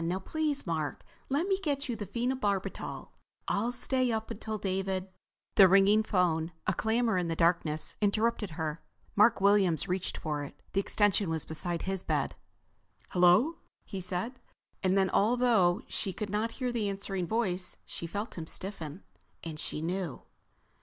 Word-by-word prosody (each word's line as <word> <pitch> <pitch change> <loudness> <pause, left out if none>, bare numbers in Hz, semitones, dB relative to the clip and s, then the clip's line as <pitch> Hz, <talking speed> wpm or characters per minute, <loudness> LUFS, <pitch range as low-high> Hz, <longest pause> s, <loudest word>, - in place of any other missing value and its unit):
Now 175 +3 0
please, 300 +8 -2
Mark, 160 -4 -2 0.3
let 285 +6 +1
me 385 -1 +1
get 290 -6 -1
you 240 - -2
the 205 -3 -6
phenobarbital. 235 -3 -2 0.4
I'll 225 +4 +1
stay 255 0 +1
up 220 -1 -2
until 220 +1 -4
David—" 190 -1 -2 0.4
The 195 - +8
ringing 195 +3 +6
phone, 175 -5 +1
a - - +2
clamor 220 0 +1
in 175 - -1
the 165 - -1
darkness, 165 -2 +1
interrupted 215 0 +1
her. 160 0 -3 0.3
Mark 210 +2 +5
Williams 195 -4 +4
reached 185 0 -2
for 150 -2 -2
it. 140 - -10
The 195 - +2
extension 200 -1 +2
was 160 -2 0
beside 170 +2 -2
his 190 -1 -1
bed. - - -1 0.8
"Hello," 185 - +5 0.3
he 195 - -5
said. 185 +8 -1 0.4
And 190 0 +2
then, 190 -1 +3
although 220 -4 +3
she 195 -3 -2
could 210 0 -4
not 220 +2 -1
hear 255 -2 -2
the 220 -4 0
answering 195 -2 -2
voice, 190 -5 -1
she 170 - -6
felt 205 +2 -4
him 160 - -6
stiffen. 185 -3 -5 0.4
And 160 -2 -6
she 155 - -3
knew. 175 -3 -3
195 Hz, 160 wpm, -30 LUFS, 175-225 Hz, 0.8 s, The